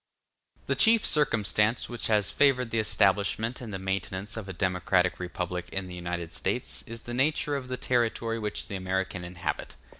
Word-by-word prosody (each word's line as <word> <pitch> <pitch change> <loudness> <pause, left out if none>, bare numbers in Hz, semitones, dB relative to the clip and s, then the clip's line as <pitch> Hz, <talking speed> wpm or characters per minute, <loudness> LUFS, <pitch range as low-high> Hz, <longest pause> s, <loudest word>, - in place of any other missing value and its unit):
The - - +1
chief 225 -1 +4
circumstance 110 -5 +3
which 120 -1 -4
has 105 -3 +3
favored 125 -4 +3
the 115 - +1
establishment 105 +3 +2
and 115 -4 -6
the 95 - -3
maintenance 95 +1 -3
of 110 -4 -6
a - - -2
democratic 90 0 +1
republic 90 0 -4
in 95 0 -2
the 90 - -8
United 85 -1 -4
States - - -2
is 115 0 -7
the 120 - -6
nature 145 +3 +1
of 135 -2 -4
the 125 0 -3
territory 115 -2 0
which 105 -1 -3
the 100 - -5
American 95 -1 -2
inhabit. 90 0 -4
105 Hz, 175 wpm, -28 LUFS, 95-120 Hz, -, chief